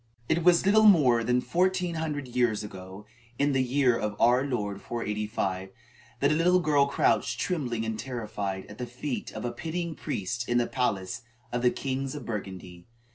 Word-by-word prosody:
It 170 +1 +1
was 175 +1 +5
little 215 +2 +6
more 130 - +5
than 125 +2 +2
fourteen 180 +2 +1
hundred 150 -4 -3
years 120 -4 +1
ago, 95 0 -9 0.3
in 145 0 +2
the 135 -1 +2
year 130 -1 +2
of 105 -2 -3
our 125 +3 +4
Lord 105 -7 -3
485, 105 -4 -3 0.5
that 140 +1 +4
a - - +4
little 180 +3 +4
girl 145 -4 +3
crouched 120 -3 +1
trembling 125 -10 -1
and 110 -1 -3
terrified, 105 -6 -4
at 105 - -12
the 125 - -3
feet 125 +2 -5
of - - -5
a 120 - -1
pitying 165 +6 -4
priest 115 -3 -4
in 120 - +2
the 120 - +3
palace 105 -9 -2 0.3
of 120 0 -1
the 125 - +5
kings 135 +1 -3
of 145 - -7
Burgundy. 95 -5 -7
125 Hz, 180 wpm, -28 LUFS, 105-145 Hz, 0.5 s, little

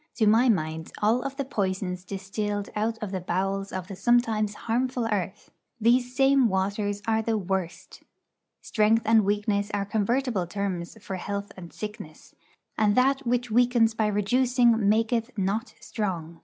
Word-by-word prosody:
To 220 - +2
my 225 +4 +5
mind, 160 -5 -1
of - - -16
all 240 +6 +2
the 275 0 -5
poisons 190 -6 -2
distilled 200 +2 -4
out 220 +2 -1
of 205 - -4
the 190 -2 -3
bowels 195 +3 -2
of 185 -1 -5
the 195 - -7
sometimes 215 0 +1
harmful 245 +2 -1
earth, 205 -2 -3 0.3
these 245 +2 +2
same 270 -2 +4
waters 200 +1 -1
are 220 0 +1
the 225 0 0
worst. 190 -3 -4 0.6
Strength 220 +1 +2
and 220 0 +5
weakness 205 0 0
are 200 -1 -1
convertible 220 -1 0
terms 190 0 -4
for 190 - -4
health 200 +2 -4
and 175 -3 -10
sickness; 210 -7 -9 0.5
and 210 -1 +3
that 270 +1 +2
which 245 -1 0
weakens 240 -1 +3
by 220 -1 0
reducing 230 +1 +2
maketh 225 +2 0
not 205 +5 -2
strong. 170 -6 -4
210 Hz, 155 wpm, -26 LUFS, 195-235 Hz, 0.6 s, my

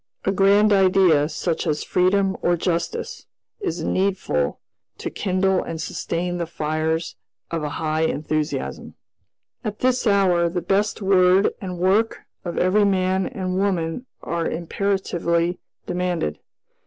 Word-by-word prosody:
A 195 - +2
grand 200 +2 +4
idea 185 -6 +4
such 165 +2 -2
as 150 -1 0
freedom 190 +1 +2
or 175 0 +2
justice 170 0 -3 0.3
is 165 0 -3
needful 185 - 0 0.4
to - - -4
kindle 190 -1 +1
and 165 -1 -5
sustain 175 +2 -3
the 170 - -2
fires 160 +1 -2 0.4
of 165 -1 -1
a 150 - -2
high 155 0 0
enthusiasm. 155 0 -3 0.7
"At 210 -3 -5
this 255 -1 +2
hour, 185 -4 +3
the 175 +1 -2
best 205 +3 0
word 190 0 +4
and 180 -3 -5
work 195 +6 +2 0.2
of 175 - -5
every 190 +4 +3
man 190 -1 +1
and 185 -7 -3
woman 190 +3 -1 0.2
are 170 -1 -1
imperatively 175 -1 -1 0.3
demanded. 180 - -2
180 Hz, 130 wpm, -22 LUFS, 165-195 Hz, 0.7 s, grand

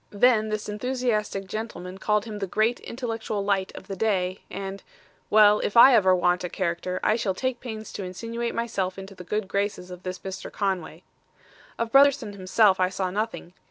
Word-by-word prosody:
Then 220 0 +3
this 215 0 -3
enthusiastic 215 -3 -1
gentleman 190 -3 -6
called 210 +1 +1
him 215 -2 -6
the 195 - -2
great 215 +5 +1
intellectual 225 -4 -4
light 195 -2 0
of - - -9
the 195 0 -6
day, 190 -2 0
and 195 0 -6 0.5
well, 210 0 +6
if 205 - -1
ever 235 -6 +8
I - - +7
want 180 0 +1
a 180 - -3
character 180 0 -2
I 215 - +3
shall 200 -5 -1
take 255 +2 -2
pains 220 -3 -7
to 200 - -5
insinuate 230 +6 -4
myself 195 -6 -2
into 195 +1 -8
the 185 - -10
good 210 +2 -2
graces 200 -2 -2
of 180 0 -9
this 185 0 -5
Mr. 190 -1 -7
Conway. 185 -4 -3 0.7
"Of 230 -1 -2
Brotherson 275 -5 +4
himself 195 +1 +3
I 185 0 +3
saw 185 -1 -2
nothing. 210 -3 -4
205 Hz, 185 wpm, -25 LUFS, 185-225 Hz, 0.7 s, ever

